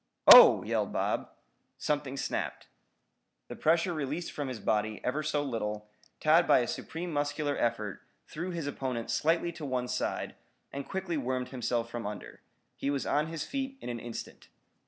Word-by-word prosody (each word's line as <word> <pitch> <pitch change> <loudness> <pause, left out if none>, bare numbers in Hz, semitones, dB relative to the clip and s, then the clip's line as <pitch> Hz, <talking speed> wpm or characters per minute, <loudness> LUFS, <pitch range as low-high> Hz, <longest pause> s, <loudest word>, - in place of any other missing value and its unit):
"Oh!" - - +10
yelled - - -1
Bob. - - -1 0.5
Something 145 -2 -2
snapped. - - -3 0.8
The - - -6
pressure 170 +3 +2
released 155 +2 -3
from 145 -2 -4
his 125 -4 -5
body, 110 0 0
ever 140 +5 0
so 150 -1 0
little, 105 -5 -4 0.3
Tad 160 +3 +4
by - - +6
a 120 - -2
supreme 170 +6 -5
muscular 145 0 -1
effort, 105 -4 -1 0.2
threw 170 +4 -5
his 170 -4 -4
opponent 130 -4 -3
slightly 165 +2 +1
to 160 -1 -10
one 130 -3 -2
side, - - -2 0.4
and 140 0 -6
quickly 190 -4 -2
wormed 130 -2 -2
himself 120 -2 -2
from 115 -3 -4
under. 105 0 -8 0.3
He 140 - -2
was 140 -1 -1
on 150 +1 +1
his 160 -2 -4
feet 270 - -4
in - - -7
an 120 -1 -4
instant. 120 0 -8
145 Hz, 165 wpm, -30 LUFS, 120-160 Hz, 0.8 s, Oh